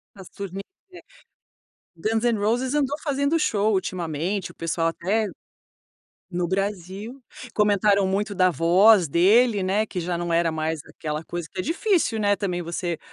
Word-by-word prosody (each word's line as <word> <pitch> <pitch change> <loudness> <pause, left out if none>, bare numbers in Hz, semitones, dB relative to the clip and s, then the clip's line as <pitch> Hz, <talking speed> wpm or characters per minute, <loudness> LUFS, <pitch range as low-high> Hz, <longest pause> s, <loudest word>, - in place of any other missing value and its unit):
As 190 -2 -12
turnê 195 -1 -6 1.4
Guns 220 +6 -1
N’ 235 -3 +2
Roses 245 +6 0
andou 290 -1 +1
fazendo 285 +2 +1
show 215 -6 +1
ultimamente, 180 +1 -2
o - - -32
pessoal 165 0 -1
até 205 +6 -1 1.0
no 175 -1 -1
Brasil 195 +5 -4 0.3
comentaram 205 -1 +3
muito 200 +2 -1
da 185 -1 +4
voz 180 +4 +5
dele, 205 - +4
né, 200 +4 +1
que 185 - -6
já 170 0 -2
não 175 -1 -2
era 165 -1 +2
mais 160 0 -2
aquela 155 0 -5
coisa, 175 -2 -5
que 190 - -9
é - - -2
difícil, 330 - 0
né, 205 -1 +2
também 180 -3 -2
você 170 0 -3
195 Hz, 150 wpm, -24 LUFS, 175-220 Hz, 1.4 s, voz